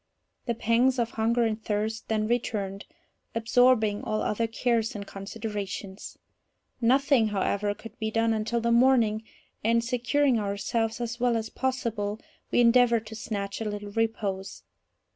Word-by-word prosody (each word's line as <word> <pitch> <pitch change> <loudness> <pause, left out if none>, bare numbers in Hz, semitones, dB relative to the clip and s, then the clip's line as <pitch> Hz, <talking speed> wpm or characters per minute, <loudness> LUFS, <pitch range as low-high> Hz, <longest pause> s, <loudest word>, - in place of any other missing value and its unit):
The 235 - 0
pangs 240 +4 +2
of 235 -1 0
hunger 230 +2 +1
and 220 0 -2
thirst 215 +1 -2
then 215 -1 0
returned, 205 -4 -2 0.5
absorbing 230 -2 +3
all 215 -1 -1
other 225 +2 0
cares 225 -1 0
and 200 -1 -5
considerations. 200 -1 -6 0.6
Nothing, 260 0 +4
however, 205 0 0
could 225 0 -12
be 220 - -1
done 225 +1 +1
until 220 +2 -1
the 235 +1 +1
morning, 235 -3 +4 0.4
and, 230 +1 +3
securing 250 +1 +1
ourselves 215 +3 -1
as 235 0 -4
well 240 -1 +2
as 220 0 -4
possible, 225 -5 -2 0.3
we - - +3
endeavoured 235 -1 +4
to 220 - -8
snatch 200 -2 -4
a - - -2
little 205 -1 -5
repose. 205 -3 -2
225 Hz, 145 wpm, -27 LUFS, 210-235 Hz, 0.6 s, Nothing